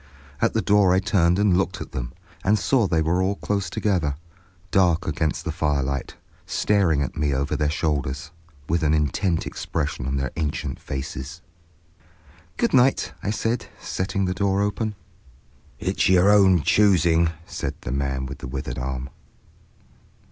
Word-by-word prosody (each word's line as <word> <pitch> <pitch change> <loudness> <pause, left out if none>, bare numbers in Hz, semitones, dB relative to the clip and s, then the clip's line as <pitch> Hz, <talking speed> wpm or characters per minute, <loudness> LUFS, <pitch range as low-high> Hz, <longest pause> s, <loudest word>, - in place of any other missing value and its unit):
At - - +2
the 110 - +1
door 100 -3 +4
I - - +4
turned 95 -3 +2
and 100 -3 +3
looked 95 - -1
at - - -7
them, - - -4 0.3
and 105 +3 +3
saw 105 +4 +2
they 80 -3 +1
were 85 +4 +1
all 95 +2 +1
close 100 -3 -2
together, 85 -7 0 0.6
dark 90 -3 +3
against 80 +2 -1
the 85 - -1
firelight, 70 -4 -1 0.3
staring 90 -9 +2
at 70 - -5
me 75 -2 0
over 70 +2 -1
their 75 -1 +1
shoulders, 75 -2 -2 0.4
with 85 +2 +1
an 80 -1 +3
intent 80 +4 0
expression 75 -5 -3
on 70 +1 -1
their 65 -1 -2
ancient 75 -2 -3
faces. 65 +4 -6 1.1
"Good - - +1
night," 130 +1 +3
I - - -2
said, 115 +2 -1
setting 95 +1 -2
the 90 - 0
door 100 +1 +1
open. 105 +1 -2 0.8
"It's - - 0
your 95 +2 +5
own 95 -5 +5
choosing," 85 -5 +4 0.2
said - - -4
the - - -5
man 65 -1 -1
with 70 +2 -7
the - - -7
withered 60 -2 -5
arm. 65 0 -4
85 Hz, 155 wpm, -24 LUFS, 70-95 Hz, 1.1 s, your